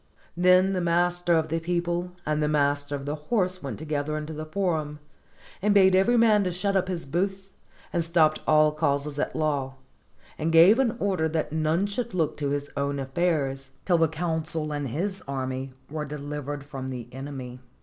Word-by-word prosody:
Then 185 +2 +4
the 185 - 0
master 175 0 +2
of 160 0 0
the 165 +2 0
people 175 +1 -2
and 150 0 0
the 150 - +2
master 145 -1 +1
of 140 -1 -6
the 145 - -2
horse 185 +3 -1
went 140 - -5
together 155 -1 -2
into 155 +1 -5
the 155 +1 -6
forum, 155 -4 -1 0.6
and 205 +1 +2
bade 190 -1 +6
every 235 +6 +4
man 220 -3 +5
to 180 - -1
shut 195 +3 -1
up 185 -1 +2
his 175 -4 -3
booth, 190 +6 -2 0.4
and 170 -2 +1
stopped 160 -2 +3
all 155 0 +5
causes 145 -1 -1
at - - -2
law, 140 -4 -1 0.6
and 160 +2 0
gave 175 +9 +7
an 245 -3 +2
order 185 -5 0
that 160 -1 -2
none 160 +4 +1
should 210 +1 -3
look 160 -4 0
to 145 -2 -1
his 145 0 -3
own 140 0 -1
affairs 135 -2 -1
till 175 -3 +3
the 165 - +4
consul 160 -1 -3
and 145 -1 -2
his 190 - -3
army 130 -1 -3 0.2
were 155 +1 -4
dehvered 145 -1 -5
from 135 -2 -6
the 125 -3 -6
enemy. 130 -2 -7
155 Hz, 185 wpm, -26 LUFS, 145-180 Hz, 0.6 s, gave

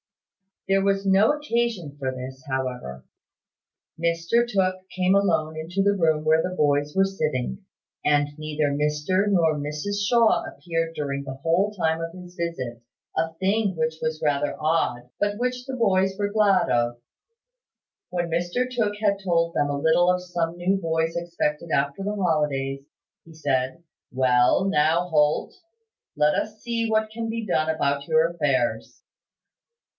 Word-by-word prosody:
There 195 0 +3
was 195 0 +1
no 195 +5 +5
occasion 235 - -2
for 130 -1 -1
this, 130 +1 -8
however. 125 - -4 0.9
Mr 170 +8 +1
Tooke 185 -3 0
came 185 0 +1
alone 160 -6 +2
into 175 +5 -1
the 200 0 +3
room 160 -4 +2
where 160 +1 +4
the 185 +2 -3
boys 145 -2 +1
were 195 0 +4
sitting; 150 - -3 0.4
and 145 -1 +3
neither 155 -1 -1
Mr 150 +7 0
nor 170 -6 +3
Mrs 150 +8 -3
Shaw 235 -1 +4
appeared 165 -1 -3
during 140 -1 -3
the 130 -1 -6
whole 170 +9 +1
time 160 -5 0
of 165 0 -5
his 180 -1 -12
visit: 130 -9 -4 0.3
a 165 0 0
thing 195 +2 0
which 160 0 -1
was 155 0 -2
rather 145 -1 +1
odd, 150 -6 0
but 205 0 0
which 250 +1 -2
the 265 -1 -5
boys 195 -5 +2
were 205 - 0
very 205 - -9
glad 205 -4 +3
of. 120 0 +1 1.1
When 175 -1 -2
Mr 175 +9 0
Tooke 225 -5 -1
had 200 -2 +1
told 170 -3 +1
them 145 - +1
a 145 - -1
little 160 +4 +4
of 180 0 -1
some 175 -1 -2
new 185 +3 +1
boys 165 -2 -1
expected 170 -2 -2
after 140 +6 0
the 205 +1 -2
holidays, 150 -7 0 0.4
he 165 - -15
said: 140 0 -1 0.3
"Well, 125 +5 +3
now, 165 0 +2
Holt, 150 -2 +2 0.6
let 150 0 +3
us 215 0 -3
see 230 -1 -1
what 220 0 +1
can 225 0 -4
be 225 0 -3
done 160 -5 +1
about 140 -3 0
your 160 +1 +4
affairs." 130 -9 -1
165 Hz, 155 wpm, -24 LUFS, 150-195 Hz, 1.1 s, no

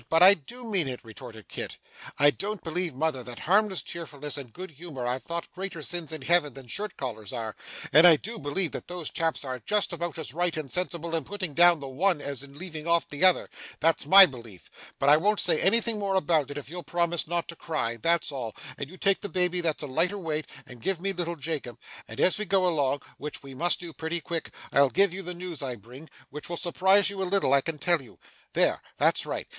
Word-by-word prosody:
But 165 +2 +5
I 190 +2 +10
do 240 - -8
mean 195 -9 0
it!' 125 -2 -4
retorted 110 -1 -11
Kit. - - -6 0.4
'I 145 0 +6
don't 205 +4 -5
believe, 170 -2 -1
mother, 150 -2 0
that 120 0 -8
harmless 200 +1 +2
cheerfulness 150 -5 -4
and 135 -5 -6
good 185 +8 -7
humour 145 -4 -7
are 125 +1 -1
thought 170 +4 -5
greater 185 -4 -5
sins 170 -1 -2
in 155 -4 -5
Heaven 150 -3 +3
than 135 -1 -9
shirt 205 - -2
collars 110 -6 -5
are, 110 -2 -5 0.4
and 160 +4 +9
I 165 - +9
do 225 +9 -6
believe 145 +4 0
that - - -7
those 175 -3 -3
chaps 165 -3 -1
are 130 -1 -4
just 210 - 0
about 170 0 -4
as 155 -6 -6
right 175 0 -1
and 150 -4 -5
sensible 170 -2 -2
in 165 -2 0
putting 185 -2 -4
down 175 +1 +6
the 140 - -6
one 170 +6 +1
as 140 -2 -4
in 140 0 -11
leaving 160 -2 -6
off 170 -1 +2
the 145 +4 -3
other 185 -1 +5 0.3
that's 160 -2 +1
my 195 +3 +11
belief. 115 - -11 0.3
But 140 - +2
I 150 - +8
won't 205 +6 +1
say 165 -3 +4
anything 230 +2 +3
more 195 -1 -1
about 160 -5 +1
it, 145 - -6
if 140 -4 -7
you'll 175 +4 -6
promise 170 +1 0
not 170 0 -2
to 170 - -6
cry, 135 -9 -3
that's 170 +6 +1
all; 125 -5 -5 0.2
and 140 - -5
you 185 - -11
take 195 0 +2
the 205 - -4
baby 180 0 0
that's 160 -3 -1
a - - -4
lighter 170 +9 +1
weight, 155 -5 -3 0.2
and 125 -2 -13
give 195 +3 0
me 195 +2 -1
little 170 -1 -3
Jacob; 145 -6 -4 0.3
and 110 - -9
as 185 - +4
we 215 - 0
go 195 -2 +2
along 145 -5 +1 0.2
(which 150 0 -6
we 135 -1 -10
must 170 +7 +1
do 170 -2 -8
pretty 160 +2 -3
quick) 165 +1 -5 0.2
I'll 140 -1 +5
give 195 +4 +3
you 195 - -3
the 180 -1 -4
news 175 -2 -6
I 130 -3 -3
bring, 125 +8 -13 0.2
which 150 +2 -7
will 170 - -3
surprise 190 +3 +3
you 195 -1 -5
a 185 - -1
little, 195 -8 +2
I 140 - +5
can 160 +2 -4
tell 170 0 +2
you. 125 - -14 0.4
There - - +2 0.2
that's - - +2
right. - - -4
165 Hz, 235 wpm, -27 LUFS, 140-180 Hz, 0.4 s, my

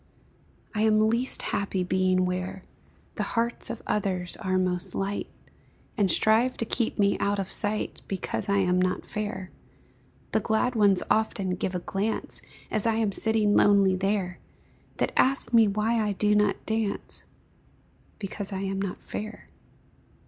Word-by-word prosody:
I 210 - -1
am 215 0 +4
least 240 +3 +1
happy 195 -2 -1
being 185 0 +2
where 185 +1 -3 0.5
The - - -1 0.2
hearts 235 +2 0
of 235 - -6
others 185 -4 -1
are 185 -3 -1
most 180 0 0
light, 195 +1 -2 0.7
And 205 -4 +2
strive 220 +8 +4
to 230 - -2
keep 230 +1 -1
me 200 -1 +2
out 200 0 +1
of 195 -1 -3
sight, 210 0 -1
Because 195 +1 -3
I 200 - +3
am 180 -2 +2
not 185 0 -1
fair; 205 -3 -5 0.8
The - - +2
glad 235 +3 0
ones 205 -5 +3
often 210 -3 +1
give 180 +1 -2
a - - 0
glance, 200 +5 -2 0.3
As 215 +1 +1
I 225 - +2
am 220 -2 +1
sitting 215 0 +2
lonely 200 -2 +5
there, 190 -1 -1 0.6
That - - 0
asks 265 -2 +2
me 225 -2 +6
why 215 +3 +1
I 210 -1 0
do 210 +2 +2
not 210 -1 +1
dance 220 -2 -3 0.9
Because 200 0 -4
I 190 -1 -3
am 195 0 -2
not 195 -2 -4
fair. 215 +1 -7
200 Hz, 155 wpm, -27 LUFS, 190-220 Hz, 0.9 s, me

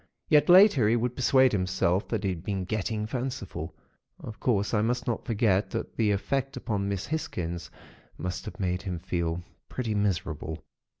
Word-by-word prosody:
Yet, 150 +2 +5
later, 180 - +7
he 115 - +4
would 125 +1 -1
persuade 130 0 +4
himself 95 0 +1
that 105 +1 -2
he 95 - +1
had 85 -2 -6
been 95 -1 -2
getting 105 +2 -2
fanciful. 125 +3 -4 0.4
Of 110 - -9
course, 105 -4 +1
I 105 - +3
must 120 +3 0
not 120 - -2
forget 105 -4 +2
that - - -4
the 110 -2 +2
effect 135 +7 -1
upon 100 -5 -2
Miss 100 -2 -2
Hisgins 90 - -4 0.5
must 90 -1 -4
have - - -8
made 90 -1 -1
him 95 -3 -4
feel 85 0 -2 0.3
pretty 120 -4 -2
miserable. 85 -6 -2
105 Hz, 170 wpm, -28 LUFS, 90-120 Hz, 0.5 s, later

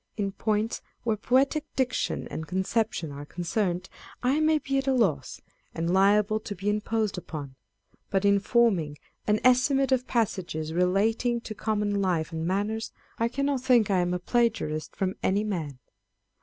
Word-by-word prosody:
In 200 -2 -1
points 215 +2 -1 0.2
where 225 -2 +1
poetrc 265 +8 +2
diction 255 -2 -1
and 160 - -5
conception 190 -3 -1
are 140 +1 -7
concerned, 180 +3 -2 0.4
I 265 +4 +2
may 310 0 +4
be 275 -2 -1
at 270 - -4
a 270 - +3
loss, 160 - 0 0.3
and 170 +2 -1
liable 205 +2 +4
to 205 -1 -6
be 200 +3 -1
imposed 210 -2 -1
upon: 145 -6 -7 0.5
but 195 0 +1
in 200 0 +5
forming 195 -9 +2 0.3
an 210 0 +3
estimate 270 +2 +4
of 255 -1 +2
passages 175 -9 -1
relating 215 +7 +2
to 220 - -6
common 205 -1 -1
life 175 -4 0
and 160 0 -3
manners, 205 +4 -1 0.3
I 230 - +2
cannot 275 +1 -1
think 240 -5 +4
I 190 - +3
am 175 0 0
a - - +1
plagiarist 180 -8 0
from 190 0 -2
any 200 +2 +1
man. 165 -10 -3
205 Hz, 160 wpm, -27 LUFS, 180-235 Hz, 0.5 s, in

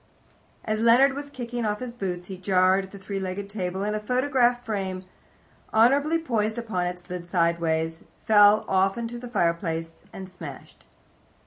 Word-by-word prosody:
As 215 0 -1
Leonard 240 +4 +5
was 285 +1 -6
kicking 245 -3 -5
off 210 -1 -1
his 250 -2 -6
boots 180 -6 -4
he 190 - -7
jarred 185 +1 +2
the 200 - -11
three 195 0 -5
legged 195 +1 -5
table, 190 -2 -3
and 210 +1 -1
a - - -1
photograph 250 +1 +1
frame, 190 -4 -3 0.7
honourably 280 +8 +4
poised 225 -8 -1
upon 215 -7 -2
it, 180 0 -4
slid 180 -1 -8
sideways, 165 -2 0 0.2
fell 210 -1 +6
off 190 +1 +2
into 235 0 -4
the 245 0 -8
fireplace, 170 -5 -1
and 190 -1 -8
smashed. 165 -7 -11
200 Hz, 155 wpm, -25 LUFS, 180-235 Hz, 0.7 s, fell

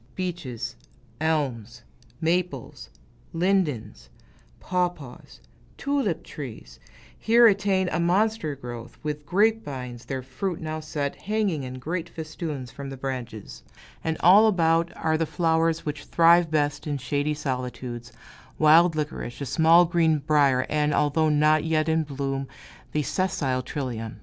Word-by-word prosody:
Beeches, 175 -10 -4 0.4
elms, 135 -8 -2 0.4
maples, 165 - -2 0.4
lindens, 165 - -1 0.5
pawpaws, 175 -8 -3 0.4
tulip 275 - -1
trees, 110 - -9 0.4
here 235 +1 +5
attain 195 -3 +3
a 160 - -1
monster 180 -2 +1
growth, 120 -3 -9
with 150 -1 -4
grape 220 +5 +2
vines, 125 - -7
their 130 -1 -4
fruit 160 +8 -4
now 155 0 -4
set, 150 -2 -3
hanging 205 -7 -1
in 130 -1 -6
great 170 +6 -4
festoons 155 -5 -6
from 140 -1 -7
the 135 - -7
branches; 125 -5 -6 0.4
and 160 0 -1
all 200 +5 +7
about, 165 -4 +2
are 160 0 0
the 165 - 0
flowers 165 -1 +1
which 150 -1 -4
thrive 170 0 +5
best 145 -1 0
in 145 -1 -1
shady 145 +4 -1
solitudes 125 -3 -5 0.5
wild 160 +2 +6
licorice, 150 -5 -4
a 140 - -3
small 165 +6 +5
green 165 -2 +2
brier, 140 -3 +2
and, 150 0 +1
although 155 +2 +2
not 155 +1 +3
yet 155 -1 +1
in 160 0 +2
bloom, 135 -2 -3 0.4
the 150 - 0
sessile 140 -8 -1
trillium. 120 -6 -5
155 Hz, 130 wpm, -25 LUFS, 135-170 Hz, 0.5 s, all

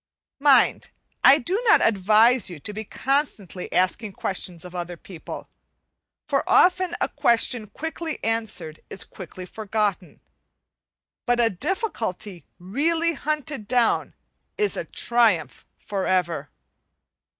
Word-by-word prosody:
Mind, 275 -3 +4 0.3
I 275 - +8
do 370 - -1
not 435 - +7
advise 220 +4 +4
you 170 -4 -8
to 210 - -6
be 215 +1 -5
constantly 225 - -2
asking 190 +4 0
questions 180 -3 -3
of 180 - -10
other 175 -1 -5
people; 170 -1 -9 0.8
for - - +1
often 360 -1 +4
a - - +1
question 235 -1 +1
quickly 320 +7 -5
answered 220 -8 -2
is - - -3
quickly 185 0 -10
forgotten, 210 -2 -2 1.1
but 245 0 +2
a 230 -1 +3
difficulty 205 - -3
really 320 - 0
hunted 300 -7 -3
down 245 -1 +1 0.4
is 420 -1 +1
a - - -4
triumph 215 - +1
for 200 -3 -3
ever. 170 -6 0
220 Hz, 115 wpm, -24 LUFS, 185-280 Hz, 1.1 s, I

